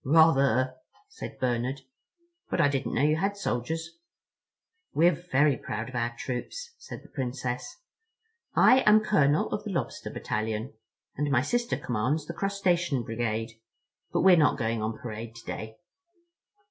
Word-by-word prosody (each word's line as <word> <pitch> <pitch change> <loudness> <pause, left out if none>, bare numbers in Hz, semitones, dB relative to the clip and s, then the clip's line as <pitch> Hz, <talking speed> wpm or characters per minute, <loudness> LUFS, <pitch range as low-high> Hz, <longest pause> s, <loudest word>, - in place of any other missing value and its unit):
"Rather," 135 -4 +4 0.3
said - - -8
Bernard, 125 +2 -1 0.7
"but - - -1
I 145 - +5
didn't 135 -4 -2
know 130 - +2
you 150 +1 +3
had 200 +4 -1
soldiers." 165 +2 -3 1.0
"We're 170 +3 +6
very 150 -4 +2
proud 110 +2 -5
of 130 - -10
our 120 0 -1
troops," 465 - -5
said - - -9
the - - -15
Princess. 125 -2 -4 0.8
"I 260 - +7
am 215 +1 +7
Colonel 150 -9 +2
of - - -2
the - - -5
Lobster - - -3
Battalion, 110 +3 -3 0.4
and 145 +1 0
my 130 -3 +3
sister 240 - 0
commands 130 +7 -1
the - - -6
Crustacean 175 -8 0
Brigade; 115 0 -3 0.5
but - - +1
we're 185 -1 +7
not 150 -2 +4
going 115 -3 -1
on 110 +1 -2
parade 115 0 -7
today." 110 -1 -7
135 Hz, 145 wpm, -28 LUFS, 120-165 Hz, 1.0 s, I